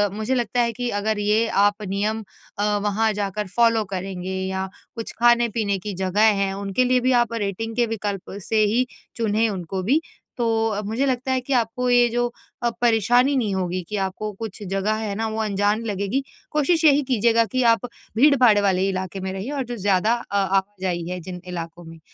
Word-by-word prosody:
मुझे 220 Hz, +5 st, -1 dB
लगता 240 Hz, 0 st, 0 dB
है 235 Hz, -, +1 dB
कि 245 Hz, +1 st, -3 dB
अगर 215 Hz, 0 st, 0 dB
ये 215 Hz, +2 st, +2 dB, 0.2 s
आप 205 Hz, +1 st, +1 dB
नियम 210 Hz, +3 st, -1 dB, 0.4 s
अ, 205 Hz, 0 st, +2 dB
वहाँ 215 Hz, +2 st, +1 dB
जाकर 205 Hz, 0 st, -3 dB
फॉलो 230 Hz, -2 st, +4 dB
करेंगे 185 Hz, 0 st, -4 dB
या 190 Hz, 0 st, -3 dB, 0.3 s
कुछ 230 Hz, -, -5 dB
खाने-पीने 235 Hz, -4 st, +3 dB
की 205 Hz, +2 st, -5 dB
जगह 190 Hz, +3 st, +1 dB, 0.2 s
हैं 195 Hz, 0 st, -1 dB
उनके 200 Hz, +4 st, 0 dB
लिए 250 Hz, 0 st, +3 dB
भी 255 Hz, +1 st, +1 dB
आप 235 Hz, -, -9 dB
रेटिंग 225 Hz, +1 st, -3 dB
के 240 Hz, 0 st, +3 dB
विकल्प 200 Hz, -3 st, -4 dB
से 220 Hz, -1 st, +3 dB
ही 235 Hz, +5 st, +2 dB, 0.3 s
चुनें 225 Hz, 0 st, +1 dB
उनको 185 Hz, -1 st, -4 dB
भी 275 Hz, -, +2 dB, 0.4 s
तो 225 Hz, -3 st, 0 dB
मुझे 225 Hz, +7 st, -1 dB
लगता 260 Hz, 0 st, -1 dB
है 260 Hz, -1 st, +1 dB
कि 270 Hz, +2 st, -3 dB
आपको 250 Hz, +1 st, 0 dB
ये 245 Hz, 0 st, +5 dB
जो 240 Hz, +1 st, 0 dB, 0.4 s
अ, 240 Hz, -, +3 dB
परेशानी 245 Hz, +4 st, +3 dB
नहीं 215 Hz, -5 st, 0 dB
होगी 185 Hz, -1 st, -1 dB
कि 210 Hz, -, -2 dB
आपको 210 Hz, +3 st, -4 dB
कुछ 220 Hz, -2 st, -6 dB
जगह 195 Hz, +2 st, +1 dB
है 205 Hz, -2 st, -2 dB
ना 225 Hz, +2 st, -1 dB
वो 220 Hz, 0 st, -4 dB
अनजान 205 Hz, +1 st, 0 dB
लगेगी। 205 Hz, +6 st, -1 dB, 0.3 s
कोशिश 320 Hz, +3 st, +2 dB
यही 290 Hz, 0 st, +5 dB
कीजिएगा 230 Hz, -1 st, +3 dB
कि 255 Hz, -, +2 dB
आप 230 Hz, -, -3 dB, 0.3 s
भीड़-भाड़ 255 Hz, -5 st, +6 dB
वाले 190 Hz, -1 st, +2 dB
इलाके 190 Hz, 0 st, -4 dB
में 190 Hz, 0 st, -3 dB
रहिए 195 Hz, +8 st, -5 dB
और 280 Hz, -2 st, -2 dB
जो 240 Hz, 0 st, -5 dB
ज़्यादा 200 Hz, +2 st, +2 dB, 0.2 s
अ, 200 Hz, -, -2 dB
आवाजाही 190 Hz, -3 st, -1 dB
है 180 Hz, 0 st, -4 dB
जिन 180 Hz, +1 st, -8 dB
इलाकों 170 Hz, -1 st, -6 dB
में। 165 Hz, 0 st, -11 dB
215 Hz, 190 wpm, -23 LUFS, 195-240 Hz, 0.4 s, भीड़-भाड़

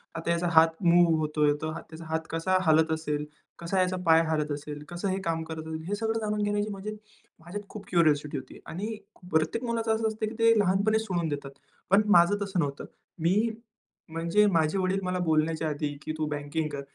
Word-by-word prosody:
आता 165 Hz, +1 st, -2 dB
याचा 170 Hz, +1 st, 0 dB
हात 165 Hz, +2 st, +4 dB
मूव्ह 170 Hz, -1 st, +5 dB
होत 155 Hz, 0 st, -3 dB
आहे, 145 Hz, 0 st, +5 dB
तर 155 Hz, -, -2 dB, 0.2 s
त्याचा 165 Hz, +1 st, -10 dB
हात 160 Hz, 0 st, -2 dB
कसा 175 Hz, +3 st, +1 dB
हालत 160 Hz, 0 st, +4 dB
असेल? 150 Hz, -2 st, -2 dB, 0.3 s
कसा 170 Hz, +3 st, -1 dB
याचा 185 Hz, 0 st, 0 dB
पाय 160 Hz, 0 st, +6 dB
हलत 155 Hz, -1 st, 0 dB
असेल? 145 Hz, 0 st, -6 dB
कसं 175 Hz, +3 st, -3 dB
हे 190 Hz, -, 0 dB
काम 165 Hz, -1 st, 0 dB
करत 160 Hz, 0 st, -7 dB
असेल?" 160 Hz, 0 st, -5 dB
हे 205 Hz, -, -1 dB
सगळं 225 Hz, +1 st, -1 dB
जाणून 210 Hz, -1 st, -2 dB
घेण्याची 205 Hz, 0 st, 0 dB
म्हणजे 205 Hz, +2 st, -6 dB, 0.4 s
माझ्यात 190 Hz, +5 st, -8 dB
खूप 210 Hz, -2 st, -9 dB
क्युरिओसिटी 150 Hz, -4 st, +2 dB
होती 130 Hz, -1 st, -9 dB
आणि 210 Hz, +6 st, -4 dB, 0.4 s
प्रत्येक 160 Hz, +9 st, +1 dB
मुलाचं 230 Hz, -2 st, 0 dB
असं 220 Hz, 0 st, 0 dB
असतं 220 Hz, 0 st, -2 dB
की 225 Hz, -, -9 dB
ते 230 Hz, 0 st, +6 dB
लहानपणीच 205 Hz, +3 st, +2 dB
सोडून 175 Hz, -5 st, -1 dB
देतात. 140 Hz, -2 st, -5 dB, 0.4 s
पण 195 Hz, +2 st, +6 dB
माझं 175 Hz, +2 st, +6 dB
तसं 195 Hz, -2 st, -2 dB
नव्हतं. 140 Hz, -3 st, -2 dB, 0.3 s
मी 195 Hz, +8 st, +2 dB, 0.6 s
म्हणजे 170 Hz, +6 st, +2 dB
माझे 165 Hz, -2 st, +2 dB
वडील 190 Hz, +1 st, +1 dB
मला 185 Hz, 0 st, -1 dB
बोलण्याच्या 160 Hz, -1 st, +1 dB
आधी, 145 Hz, -1 st, -3 dB
की -, -, -4 dB
"तू 155 Hz, -, -1 dB
बँकिंग 145 Hz, +2 st, -3 dB
कर." 140 Hz, -1 st, -4 dB
170 Hz, 200 wpm, -28 LUFS, 155-200 Hz, 0.6 s, पाय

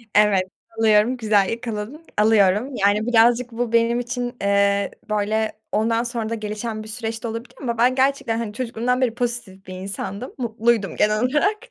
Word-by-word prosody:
Evet, 210 Hz, -3 st, +5 dB, 0.4 s
alıyorum, 220 Hz, +3 st, +4 dB
güzel 210 Hz, -4 st, +2 dB
yakaladın. 230 Hz, +6 st, -5 dB
Alıyorum. 215 Hz, +4 st, +3 dB
Yani 205 Hz, +1 st, +2 dB
birazcık 240 Hz, +1 st, +4 dB
bu 230 Hz, 0 st, -3 dB
benim 230 Hz, +1 st, +3 dB
için, 245 Hz, 0 st, -4 dB
eee, 200 Hz, 0 st, +2 dB, 0.2 s
böyle 215 Hz, +1 st, 0 dB, 0.2 s
ondan 225 Hz, +2 st, +1 dB
sonra 235 Hz, -2 st, -3 dB
da 230 Hz, -, -2 dB
gelişen 215 Hz, +1 st, -5 dB
bir -, -, -11 dB
süreç 225 Hz, +1 st, -5 dB
de -, -, -2 dB
olabilir 230 Hz, +2 st, -6 dB
ama 235 Hz, -3 st, -2 dB
ben 250 Hz, +2 st, +3 dB
gerçekten, 265 Hz, -4 st, +1 dB
hani, 220 Hz, -3 st, -4 dB
çocukluğumdan 250 Hz, +1 st, -1 dB
beri 240 Hz, -3 st, +1 dB
pozitif 235 Hz, -6 st, -4 dB
bir 185 Hz, -, -7 dB
insandım. 195 Hz, +4 st, -6 dB
Mutluydum 230 Hz, -4 st, 0 dB
genel 210 Hz, 0 st, +2 dB
olarak. 300 Hz, +11 st, +2 dB
225 Hz, 165 wpm, -22 LUFS, 210-245 Hz, 0.4 s, Evet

